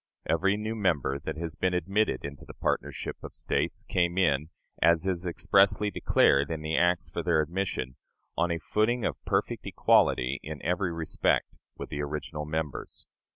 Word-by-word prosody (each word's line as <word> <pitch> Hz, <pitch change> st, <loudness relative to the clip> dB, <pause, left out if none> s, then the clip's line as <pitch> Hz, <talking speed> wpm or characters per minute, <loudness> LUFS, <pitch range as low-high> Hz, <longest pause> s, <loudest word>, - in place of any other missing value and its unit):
Every 95 Hz, +5 st, +2 dB
new 110 Hz, +1 st, -3 dB
member 80 Hz, -10 st, 0 dB
that -, -, -5 dB
has 80 Hz, -1 st, -4 dB
been 90 Hz, +3 st, 0 dB
admitted 95 Hz, -5 st, 0 dB
into 70 Hz, 0 st, -8 dB
the -, -, -12 dB
partnership -, -, -2 dB
of -, -, -9 dB
States -, -, -1 dB
came 85 Hz, 0 st, 0 dB
in, 75 Hz, -4 st, +2 dB, 0.3 s
as 85 Hz, +1 st, +4 dB
is 90 Hz, -1 st, 0 dB
expressly 100 Hz, +4 st, +3 dB
declared 70 Hz, -6 st, +3 dB
in 80 Hz, -2 st, -4 dB
the 80 Hz, +1 st, -1 dB
acts 90 Hz, +1 st, +2 dB
for -, -, -2 dB
their 85 Hz, -3 st, +2 dB
admission, 80 Hz, -6 st, -2 dB, 0.4 s
on 85 Hz, +1 st, +1 dB
a 85 Hz, -, 0 dB
footing 110 Hz, +6 st, 0 dB
of -, -, -3 dB
perfect -, -, -1 dB
equality 65 Hz, +3 st, +3 dB
in 75 Hz, -1 st, -7 dB
every 90 Hz, +1 st, 0 dB
respect 80 Hz, -2 st, 0 dB, 0.2 s
with -, -, -7 dB
the 75 Hz, -, -3 dB
original 75 Hz, +1 st, -4 dB
members. 75 Hz, -2 st, -4 dB
85 Hz, 165 wpm, -28 LUFS, 75-95 Hz, 0.4 s, as